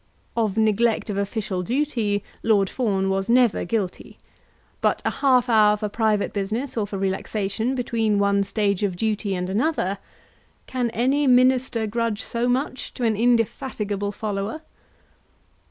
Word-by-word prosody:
Of 220 -3 0
neglect 220 +1 +2
of 200 - -3
official 200 -2 -2
duty 225 - -1 0.2
Lord 205 -4 +2
Fawn 200 -6 0
was 195 +2 -1
never 240 -2 +3
guilty; 195 -1 -3 0.6
but - - +2
a - - +2
half 255 -3 +3
hour 210 -3 +5
for 210 0 -3
private 215 -1 0
business 215 +7 -2
or 215 -3 -1
for 200 - -5
relaxation 200 +5 -2
between 225 -4 0
one 200 0 +2
stage 200 -1 0
of 200 -3 0
duty 210 0 -1
and 180 0 -2
another, 200 - 0 0.7
can 250 -2 -1
any 265 +5 +1
Minister 255 -2 +3
grudge 225 0 -2
so 240 +1 -1
much 260 +1 -2
to 250 - -4
an 225 -2 +2
indefatigable 220 -3 0
follower? 210 +7 -4
220 Hz, 140 wpm, -23 LUFS, 200-240 Hz, 0.7 s, hour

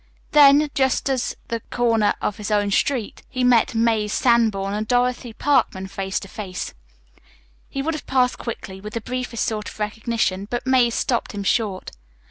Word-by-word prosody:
Then, 290 0 +6
just 265 0 +1
at 255 -2 -1
the 230 - -2
corner 230 -3 +2
of 210 - -1
his 210 -1 -5
own 205 -1 +1
street, 240 0 0
he 255 - -2
met 245 -2 +4
Mazie 225 -2 +2
Sanborn 215 -4 +2
and 215 +1 -2
Dorothy 245 0 +1
Parkman 220 -7 +1
face 190 0 -3
to 195 - -9
face. 190 -2 -6 1.0
He 275 - -3
would 325 +3 -1
have 305 - -7
passed 255 -1 +2
quickly, 190 -5 -6
with 210 +1 -8
the 230 - -3
briefest 250 0 -3
sort 215 -2 -3
of - - -13
recognition, 210 -2 -1
but 240 0 -3
Mazie 260 -2 +4
stopped 235 0 -1
him 200 -1 -4
short. 200 -2 -1
230 Hz, 170 wpm, -22 LUFS, 205-250 Hz, 1.0 s, Then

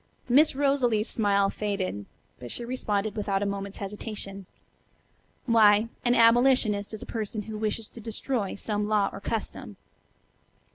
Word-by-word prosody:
Miss 275 +4 +5
Rosalie's 260 -6 +2
smile 200 -2 +2
faded, 190 - -3 0.3
but 120 0 -8
she 240 - -4
responded 215 -4 -2
without 200 -2 -1
a - - 0
moment's 200 0 -4
hesitation: 200 -1 -7 1.0
"Why, 220 -2 +5
an 245 0 +3
'abolitionist' 230 -3 +4
is 215 - -8
a - - -8
person 215 -1 -4
who 220 +1 -7
wishes 215 +1 -2
to 230 - -11
destroy 225 -1 -3
some 210 0 -2
law 210 -2 +2
or - - -6
custom." 220 +1 -4
215 Hz, 140 wpm, -27 LUFS, 200-230 Hz, 1.0 s, Miss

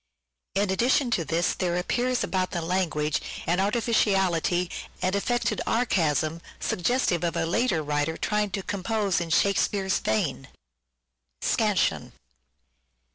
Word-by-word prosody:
In 200 0 +1
addition 245 +5 +2
to 175 - +1
this 165 +2 0
there 175 -2 -1
appears 245 +7 0
about 185 -1 -1
the 175 - -3
language 165 -4 0 0.2
an 175 +2 +1
artificiality 195 -5 +1 0.3
and 185 +1 0
affected 235 +1 0
archaism 165 -8 +1 0.2
suggestive 180 -3 0
of 170 - -1
a - - 0
later 175 -2 +1
writer 150 +2 -1
trying 210 -1 0
to 190 +1 -4
compose 200 -2 -1
in 170 - -4
Shakespeare's 195 +2 +2
vein. 135 -10 -1 1.0
Scansion. - - +1
190 Hz, 120 wpm, -26 LUFS, 170-210 Hz, 1.0 s, addition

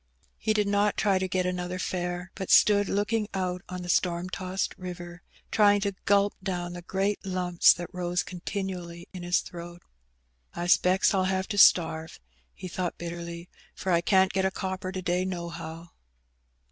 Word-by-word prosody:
He 215 - +1
did 210 -1 +1
not 205 0 +2
try 195 -3 +2
to 190 - -1
get 185 0 0
another 180 0 -2
fare, 180 0 -3
but 190 - -6
stood 205 -1 +5
looking 210 +2 0
out 180 -1 -2
on 180 0 -5
the - - -7
storm 175 0 0
tossed 185 0 -2
river, 175 -1 -8 0.3
trying 205 -1 +5
to 200 0 -1
gulp 200 0 +3
down 175 -2 -3
the 175 - -7
great 195 +3 -1
lumps 180 -2 +4
that 175 -1 -8
rose 180 0 -1
continually 180 -2 -5
in 185 - -7
his 175 0 +1
throat. 175 0 -10 0.4
" - - -44
I 175 - -3
specks 180 +2 +4
FU 195 -2 +2
have 190 0 0
to 205 - -3
starve," 160 -3 +4 0.4
he 185 - -7
thought 180 0 -3
bitterly, 170 0 -6
" - - -29
for 190 - -2
I 170 -1 +4
can^t 190 +1 +3
get 190 - 0
a 190 - +3
copper 190 -1 -4
to 185 -1 -5
day 180 +1 +1
nohow." 170 -2 -6
180 Hz, 180 wpm, -27 LUFS, 175-190 Hz, 0.4 s, stood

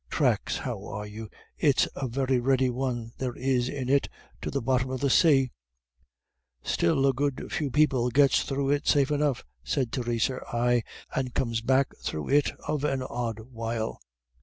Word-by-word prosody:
Thracks, - - +1
how - - -4
are 105 0 -5
you. 105 +1 -8 0.3
It's 145 -4 +3
a 135 - -2
very 130 +1 +1
ready 130 0 +2
one 120 -2 -3
there 125 -2 -2
is 130 -1 0
in 135 -3 -4
it 140 +1 +2 0.3
to - - -3
the - - -1
bottom 130 +1 +1
of 130 0 -3
the 140 0 +1
say." 135 -5 +5 1.1
"Still 135 +11 +2
a 135 - +4
good 140 +1 -2
few 150 -3 -1
people 130 -3 +3
gets 140 +2 +4
through 135 0 -1
it 145 0 0
safe 140 -1 +3
enough," 145 -4 +1 0.2
said 115 - -1
Theresa, 120 +1 -1
"ay, 120 0 +2 0.3
and 130 -2 -2
comes 115 -3 0
back 130 +3 +2
through 75 - -4
it 145 +1 +4 0.2
of 150 -2 -1
an 135 -3 0
odd 120 -3 -3
while." 115 -1 -3
130 Hz, 170 wpm, -27 LUFS, 120-135 Hz, 1.1 s, say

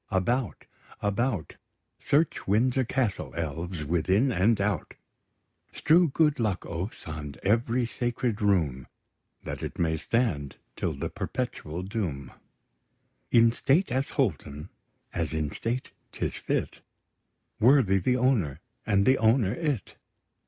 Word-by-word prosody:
About, 110 +4 -1 0.3
about; 105 - -1 0.4
Search 150 +2 +1
Windsor 125 +6 +2
Castle, 120 -4 -1
elves, 80 +1 -3
within 95 - +2
and 100 +3 +3
out: 100 -5 -1 0.8
Strew 170 +2 +4
good 150 0 +2
luck, 105 -5 -1
ouphes, 90 +6 -5
on 75 -3 -6
every 115 +4 +2
sacred 120 -2 -2
room! 80 -11 +1 0.6
That - - -5
it - - -5
may 80 -1 +1
stand 80 - -1 0.2
till - - -2
the - - -4
perpetual 90 - -4
doom, 90 - -4 1.0
In 115 -1 +6
state 140 +9 +2
as 130 +2 0
wholesome, 70 +2 -1 0.4
as - - -2
in 75 -2 -1
state 120 +8 -3 0.2
'tis - - -2
fit - - -2 0.8
Worthy 115 -6 +5
the 125 +7 +1
owner, 110 - +1 0.3
and 100 -2 +3
the 130 +1 +4
owner 110 -2 +3
it. 145 - -3
105 Hz, 120 wpm, -27 LUFS, 85-125 Hz, 1.0 s, In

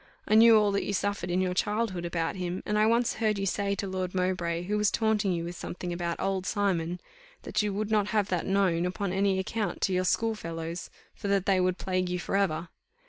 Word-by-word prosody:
I - - +1
knew 225 +1 +8
all 210 -1 +3
that 200 - 0
you 205 - -2
suffered 200 -2 -1
in 180 +1 +1
your 185 -1 0
childhood 205 -2 -1
about 170 0 -2
him, 180 0 -4
and 210 - -1
I 215 - +4
once 235 +1 +2
heard 215 -2 +2
you 195 - -1
say 200 +1 0
to 200 - -3
Lord 185 -1 -3
Mowbray 175 -2 0
who 205 +4 -2
was 210 -1 +3
taunting 220 -3 +1
you 170 -2 -1
with 175 +1 -5
something 175 +1 -5
about 170 -1 -3
old 190 -1 -1
Simon, 180 -3 0 0.4
that 215 - 0
you 210 -1 -1
would 215 +1 -2
not 210 -2 +2
have 210 -2 +1
that 180 -2 -1
known, 185 -3 +2
upon 185 0 -3
any 195 0 +2
account, 205 +2 -2
to 190 - +1
your 185 0 +1
school 225 +5 +1
fellows, 165 -3 -5 0.2
for 205 - -6
that 200 -1 +1
they 190 -2 +3
would 180 0 +1
plague 185 -1 -1
you 180 - -1
for 180 - -3
ever. 175 -4 0
190 Hz, 235 wpm, -28 LUFS, 180-205 Hz, 0.4 s, knew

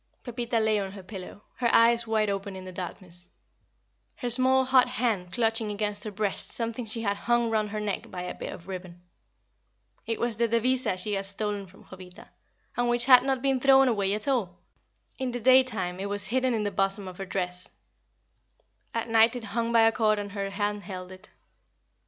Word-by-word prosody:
Pepita 240 -1 -2
lay 220 -1 +2
on 195 -1 -5
her 195 -2 -10
pillow, 195 +1 -10
her 240 -2 +1
eyes 235 0 +4
wide 220 -1 +1
open 195 0 -4
in 185 0 -9
the 185 - -8
darkness, 180 -1 -8 0.9
her 245 -3 -1
small 260 +2 +5
hot 260 -1 +4
hand 230 -8 -2
clutching 225 +1 0
against 205 0 -2
her 215 - -4
breast 205 -1 -2
something 230 0 -2
she 225 +2 -4
had 200 -1 0
hung 235 +2 0
round 215 -1 0
her 215 +1 -4
neck 210 -2 -4
by 180 -1 -6
a 180 - -5
bit - - -7
of 170 - -11
ribbon. 180 -2 -8 1.0
It 225 - -2
was 235 -2 -1
the 235 0 +2
devisa 235 -2 +1
she 205 +3 -1
had 195 0 -1
stolen 205 0 -3
from 190 +2 -18
Jovita, 185 -1 -13 0.5
and 245 0 0
which 240 0 +5
had 255 -1 +8
not 265 -1 -1
been 270 -1 +1
thrown 270 +1 +5
away 200 -4 +1
at 215 - -5
all. 225 -10 -1 0.6
In 260 -1 -2
the 245 0 -3
daytime 230 -8 +3
it 200 +1 -3
was 205 -1 +1
hidden 255 +3 +1
in 215 - -1
the 205 - -2
bosom 195 +1 +1
of 185 0 -10
her 195 - -4
dress; 180 -1 -4 1.2
at 230 0 -2
night 225 +1 +4
it 245 - -5
hung 230 +2 -2
by 230 -1 +5
a 225 0 +5
cord 215 -2 +1
and 205 -1 -5
her 200 -1 -4
hand 205 0 -2
held 185 -2 -8
it. 185 0 -13
215 Hz, 200 wpm, -27 LUFS, 195-240 Hz, 1.2 s, had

